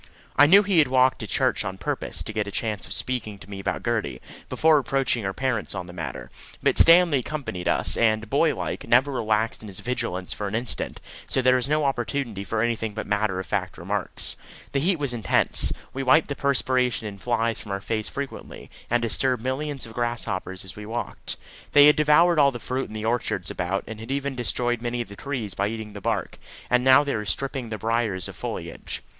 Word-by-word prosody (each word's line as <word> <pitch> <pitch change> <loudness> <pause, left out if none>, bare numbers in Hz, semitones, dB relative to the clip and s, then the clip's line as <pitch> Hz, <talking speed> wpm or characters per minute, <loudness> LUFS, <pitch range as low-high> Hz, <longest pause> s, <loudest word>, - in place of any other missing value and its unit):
I 145 - +7
know 200 +6 +7
he 195 -4 +3
had 150 - +5
walked 130 0 +3
to - - -5
church - - +1
on 95 0 -5
purpose - - -3
to 110 - -7
get 105 -1 -1
a - - -5
chance 105 -1 -3
of - - -3
speaking 115 -5 -1
to 95 - -14
me 100 -1 -7
about 95 - -3
Gertie, - - -1 0.3
before 155 -1 +4
approaching 135 -4 0
her 95 - 0
parents 120 -2 -1
on 90 -2 -4
the 90 - -11
matter; 85 -2 -6 0.3
but - - +4
Stanley 165 -4 +7
accompanied 125 -10 -5
us, - - +2
and, 110 -1 +2
boy - - +2
like, - - -4
never 130 +4 +4
relaxed 110 -3 0
in 105 -2 -9
vigilance 95 -4 -3
for 105 - -4
an 100 - -3
instant, 120 +1 -1 0.3
so - - 0
there 130 0 +4
was 130 +2 0
no 150 0 +2
opportunity 120 -5 -2
for 110 +2 -1
anything 115 -2 -2
but 110 - -4
matter 105 -2 0
of 95 - -4
fact - - -2
remarks. - - -2 0.4
The 140 - +1
heat 180 +6 +2
was 140 -4 -2
intense. 115 -3 +2 0.2
We 135 - -3
wiped 140 +5 +4
the 140 - -2
perspiration 130 -4 +1
and 100 -2 -7
flies 115 -2 0
from 100 - -8
our 100 - -2
face 110 +1 -3
frequently, 140 -1 -7 0.2
and 120 0 +1
disturbed 125 +1 0
millions 135 +2 -2
of 115 - -11
grasshoppers 110 -6 -3
as 95 - -9
we 105 0 -8
walked. 120 +2 -5 0.4
They 145 0 +8
had 150 - +7
devoured 155 +3 +4
all 140 -1 +6
the 130 - -5
fruit 130 +3 -3
in 110 - -10
the 110 0 -4
orchards 110 -6 -1
about, 90 +2 -2
and 110 -1 -8
had 110 +2 -9
even 140 0 -1
destroyed 120 -1 -1
many 120 0 -2
of 120 - -7
the 100 - -9
trees 120 -6 -4
by 100 +3 0
eating 110 -1 -6
the 100 - -8
bark, - - -2 0.3
and 125 0 +4
now 130 +2 +7
they 145 - -2
were 105 - -2
stripping 130 +5 -2
the 110 - -4
briers 110 -4 0
of - - -9
foliage. - - -6
120 Hz, 215 wpm, -25 LUFS, 105-135 Hz, 0.4 s, They